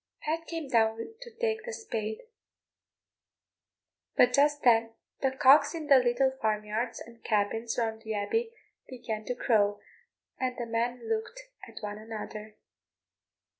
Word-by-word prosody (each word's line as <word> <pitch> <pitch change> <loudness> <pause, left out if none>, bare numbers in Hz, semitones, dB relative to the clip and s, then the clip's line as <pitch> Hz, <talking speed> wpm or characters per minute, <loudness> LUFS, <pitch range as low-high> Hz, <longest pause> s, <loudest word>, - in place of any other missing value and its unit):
Pat 325 +2 -2
came 330 -3 -4
down 225 - +1
to - - -8
take 450 -1 -1
the 480 - -5
spade, 225 - -4 2.0
but 250 0 +6
just 290 +2 +3
then 230 -2 +4 0.3
the 270 - +3
cocks 285 +4 +5
in 320 -2 -5
the 280 -2 +7
little 250 +2 +2
farmyards 215 +2 -1
and 230 0 -13
cabins 225 +2 0
round 225 -2 -1
the 220 -1 -4
abbey 450 - -1 0.4
began 225 -4 -5
to 250 - -2
crow, 205 -4 +2 0.6
and 255 -1 -1
the 240 - -3
men 230 +1 -2
looked 225 - -3 0.2
at - - -11
one 205 0 -5
another. 215 -1 -8
235 Hz, 135 wpm, -29 LUFS, 220-285 Hz, 2.0 s, the